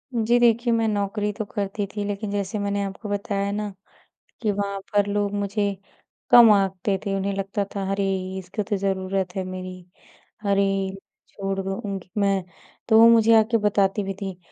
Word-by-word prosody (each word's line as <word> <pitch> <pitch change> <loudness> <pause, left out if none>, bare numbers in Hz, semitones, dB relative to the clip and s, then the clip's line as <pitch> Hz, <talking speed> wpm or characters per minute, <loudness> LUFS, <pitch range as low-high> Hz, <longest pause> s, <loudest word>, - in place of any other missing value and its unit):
जी 235 +1 +3
देखिए, 235 0 +3
मैं 225 -1 +2
नौकरी 205 0 -1
तो 215 0 -4
करती 200 0 -3
थी। 205 - -2
लेकिन 205 0 -3
जैसे 200 +1 -2
मैंने 200 0 -1
आपको 195 +2 -6
बताया 200 0 -1
ना, 205 -1 -3 0.7
कि 215 - +1
वहाँ 200 0 -3
पर 205 -1 +3
लोग 205 0 -1
मुझे 200 0 -1 0.5
कम 240 -2 +9
आँकते 195 0 +1
थे। 200 -2 -1
उन्हें 195 +1 -1
लगता 195 +1 -2
था 195 -1 -2
अरे 195 0 0 0.3
इसको 190 +3 -4
तो 205 - -2
ज़रूरत 190 -1 -2
है 190 - -1
मेरी, 185 0 -7 0.7
अरे 195 -1 +1 0.4
छोड़ 195 -1 -4
दो 195 0 -2
उनकी 195 -2 -5
मैं 195 -1 +2 0.5
तो 225 +1 +8
मुझे 230 0 +5
आ - - +6
के 230 - +4
बताती 200 0 +2
भी 195 0 -3
थी, 190 -2 -5
200 Hz, 175 wpm, -24 LUFS, 195-210 Hz, 0.7 s, कम